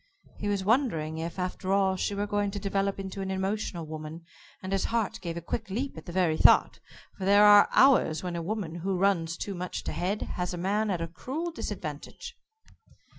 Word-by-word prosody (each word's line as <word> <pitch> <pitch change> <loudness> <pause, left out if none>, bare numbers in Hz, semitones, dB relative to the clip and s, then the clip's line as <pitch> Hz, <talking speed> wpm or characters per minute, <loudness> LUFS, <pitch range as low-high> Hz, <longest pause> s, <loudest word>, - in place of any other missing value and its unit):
He 205 - -3
was 200 -2 0
wondering, 190 - +1
if, 165 +2 -5
after 185 +1 -3
all, 195 -1 +3
she 200 +2 -2
were 205 +1 -1
going 205 0 0
to 205 +1 -5
develop 195 0 -1
into 195 0 -5
an 190 - -3
emotional 190 -3 -2
woman, 155 +1 -8 0.4
and 185 - -5
his 195 - +1
heart 225 -1 -1
gave 170 -2 -4
a - - -4
quick 200 +5 -4
leap 250 +8 -3
at 160 - -11
the - - -5
very 170 -3 +1
thought - - +5 0.4
for - - -5
there 205 +1 +6
are 205 0 +8
hours 255 - +4
when 180 -1 -3
a 170 - -2
woman 190 -2 -3
who 185 +2 -2
runs 170 -4 +1
too 200 - -4
much 180 -1 -5
to - - -4
head 195 +4 -2
has 180 0 -3
a - - -6
man 205 +5 0
at 180 -4 -1
a 165 - -2
cruel 275 - -5
disadvantage. 475 +7 -6
190 Hz, 210 wpm, -28 LUFS, 170-205 Hz, 0.4 s, are